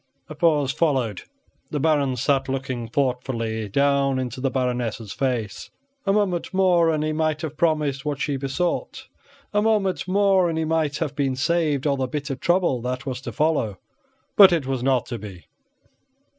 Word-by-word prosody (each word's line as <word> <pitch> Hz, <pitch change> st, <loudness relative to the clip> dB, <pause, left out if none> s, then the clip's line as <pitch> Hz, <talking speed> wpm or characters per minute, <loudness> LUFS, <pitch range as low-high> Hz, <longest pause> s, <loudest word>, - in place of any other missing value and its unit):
A -, -, -6 dB
pause 150 Hz, -5 st, +2 dB
followed. 130 Hz, -, 0 dB, 0.5 s
The 150 Hz, -, -2 dB
Baron 145 Hz, -3 st, +2 dB
sat 135 Hz, +2 st, 0 dB
looking 130 Hz, -3 st, -3 dB
thoughtfully 120 Hz, -4 st, -2 dB
down 140 Hz, +2 st, +2 dB
into 130 Hz, -1 st, -4 dB
the 135 Hz, -, +1 dB
Baroness' 120 Hz, -5 st, -2 dB
face. 125 Hz, -6 st, -2 dB, 0.4 s
A -, -, +4 dB
moment 195 Hz, -5 st, 0 dB
more, 180 Hz, -3 st, +4 dB
and 155 Hz, -1 st, 0 dB
he 155 Hz, 0 st, -1 dB
might 155 Hz, 0 st, -1 dB
have 155 Hz, -1 st, -4 dB
promised 150 Hz, -4 st, 0 dB
what 145 Hz, -2 st, -3 dB
she 145 Hz, 0 st, -1 dB
besought; 140 Hz, +6 st, -2 dB, 0.5 s
a 205 Hz, -, +3 dB
moment 210 Hz, -4 st, +1 dB
more, 190 Hz, -2 st, +3 dB
and 160 Hz, -, -2 dB
he 160 Hz, -, 0 dB
might 155 Hz, -3 st, 0 dB
have 150 Hz, -4 st, -3 dB
been 135 Hz, -2 st, 0 dB
saved 150 Hz, 0 st, 0 dB
all 140 Hz, -2 st, +2 dB
the 130 Hz, -1 st, -1 dB
bitter 140 Hz, +1 st, -3 dB
trouble 175 Hz, -4 st, +1 dB
that 125 Hz, 0 st, -4 dB
was 130 Hz, -2 st, -4 dB
to -, -, -6 dB
follow. 150 Hz, -, 0 dB, 0.6 s
But 195 Hz, -2 st, +9 dB
it 165 Hz, -6 st, +1 dB
was 130 Hz, -2 st, -2 dB
not 130 Hz, -1 st, +2 dB
to 120 Hz, -, -5 dB
be. 95 Hz, -4 st, -10 dB
140 Hz, 170 wpm, -23 LUFS, 130-160 Hz, 0.6 s, But